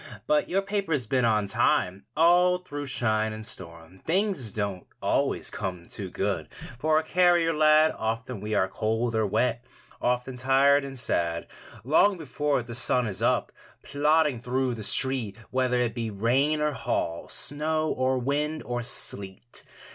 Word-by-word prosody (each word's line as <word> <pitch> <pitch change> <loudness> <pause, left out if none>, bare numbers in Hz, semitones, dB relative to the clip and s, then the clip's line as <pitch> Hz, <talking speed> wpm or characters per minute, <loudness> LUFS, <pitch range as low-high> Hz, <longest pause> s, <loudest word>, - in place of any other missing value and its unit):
But 300 -1 +1
your 195 +2 +1
paper's 195 - -1
been 125 +2 +1
on 105 -2 +2
time 95 -1 +1
All 175 +2 +5
through 145 -5 -7
shine 110 -4 0
and 110 0 -7
storm. 85 -3 -9
Things 180 - -1
don't 100 -3 -4
always - - 0
come 90 -2 -5
too 100 -3 -7
good 95 -5 -2 0.3
For 155 +2 +2
a 160 - +2
carrier 175 -2 +3
lad. 155 0 +5
Often 115 0 -3
we 105 +1 -2
are 95 - +2
cold 110 +4 -1
or 110 -1 +1
wet, 120 +3 0 0.4
Often 125 +1 -1
tired 135 +2 +4
and 135 -1 -7
sad. 85 -8 -1 0.4
Long 170 - +3
before 145 -3 -1
the 120 0 -8
sun 125 0 +2
is 100 -4 -3
up, - - +1 0.3
Plodding 150 -1 +2
through 125 +1 -1
the 115 - -7
street, 120 -2 0
Whether 130 -1 +1
it 120 -2 0
be 115 -1 -3
rain 130 +9 +1
or 150 0 +1
hail, 85 -9 -2
Snow 155 +2 0
or 130 0 0
wind 150 +4 -1
or 120 0 -3
sleet. 95 - -2
125 Hz, 155 wpm, -26 LUFS, 110-150 Hz, 0.4 s, All